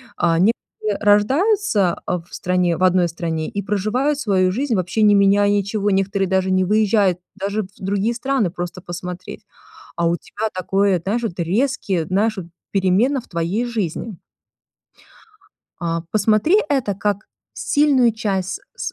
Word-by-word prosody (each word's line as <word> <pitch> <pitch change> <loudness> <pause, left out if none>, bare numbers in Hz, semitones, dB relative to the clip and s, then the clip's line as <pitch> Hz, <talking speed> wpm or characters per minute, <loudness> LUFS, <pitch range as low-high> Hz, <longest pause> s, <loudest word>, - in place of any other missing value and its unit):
А, 165 -1 +1
некоторые 210 0 -1
рождаются, 215 - +2
э, 180 - 0
в - - -22
стране 180 -2 0
в 185 - -2
одной 180 -1 +3
стране 160 -1 -3
и 200 - -3
проживают 215 +9 0
свою 190 -8 +2
жизнь, 255 +1 -1
вообще 185 +3 -1
не 210 -1 +6
меняя 200 0 +4
ничего. 205 +1 0
Некоторые 195 -1 0
даже 190 0 +1
не 185 0 +3
выезжают 200 -2 +2 0.2
даже 205 +2 -2
в 185 - -10
другие 200 +4 -1
страны 250 -5 0
просто 175 +1 -6
посмотреть. 180 +2 -7 0.5
А 170 0 +1
у 170 - +2
тебя 215 +5 -4
такое, 195 0 +1
знаешь, 230 +6 -1
вот 185 -6 -3
резкие, 190 - 0
знаешь, 205 +4 0
вот 180 - -5 0.3
перемены 200 +8 +2
в 240 - -13
твоей 175 +7 -1
жизни. 220 -2 -3 1.7
А, 165 0 -1
посмотри 215 - +3
это 265 -9 0
как 205 +1 -2 0.3
сильную 280 -5 +3
часть 200 - -2 0.2
с - - -4
200 Hz, 150 wpm, -20 LUFS, 185-220 Hz, 1.7 s, не